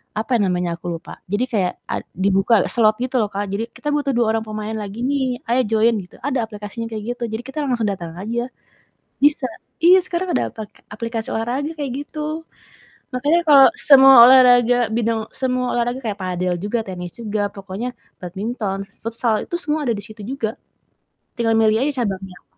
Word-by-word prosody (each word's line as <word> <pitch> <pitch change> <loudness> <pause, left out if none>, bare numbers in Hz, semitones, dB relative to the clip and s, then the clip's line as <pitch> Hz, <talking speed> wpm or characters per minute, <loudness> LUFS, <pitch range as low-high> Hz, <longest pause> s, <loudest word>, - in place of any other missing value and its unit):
apa 225 +4 0
namanya 180 -3 0
aku 175 +1 -7
lupa, 165 - -12
jadi 205 +5 +1
kayak 200 -8 0
ad - - -2 0.2
dibuka 195 +3 +3
slot 215 -2 +3
gitu 255 0 -1
loh 210 - -1
Kak. 200 +1 -2
Jadi 225 +4 -3
"Kita 295 - -6
butuh 290 -1 0
2 230 -2 +2
orang 220 - -1
pemain 215 0 -5
lagi 210 0 -6
nih, 260 -3 0
ayo 240 +2 +3
join," 225 +1 +3
gitu 180 - -15
ada 270 -1 0
aplikasinya 210 +2 -7
kayak 215 -1 -5
gitu. 240 - -7
Jadi 220 +1 -3
kita 270 +4 -6
langsung 245 -5 0
datang 175 -5 -4
aja. 235 +5 -3 0.7
Bisa 290 -2 +3 0.4
iya, 360 +2 +8
sekarang 360 0 -2
ada - - 0
pake 215 -2 -10
aplikasi 230 +1 -4
olahraga, 250 +7 -2
kayak 285 -3 -3
gitu. 310 +1 -5 0.7
Makanya 290 +7 +2
kalau 280 -3 +8
semua 270 -1 +7
olahraga, 245 -1 +6 0.2
bidang 230 -1 0 0.2
semua 255 -1 -1
olahraga, 240 +1 -1
kayak 210 -2 -2
padel 180 0 -1
juga, 210 +3 -1
tenis 180 -2 -6
juga, 215 -2 -3
pokoknya 200 +5 -5 0.3
badminton, 195 +2 -3 0.2
futsal 230 -1 -1
itu - - -5
semua 310 -3 -1
ada 240 - +1
di 205 - -7
situ 215 0 -12
juga, 235 0 -3 0.9
tinggal 230 -1 +1
milih 220 -1 +4
aja 285 -4 -1
cabangnya. 190 -3 -5
230 Hz, 175 wpm, -20 LUFS, 205-260 Hz, 0.9 s, iya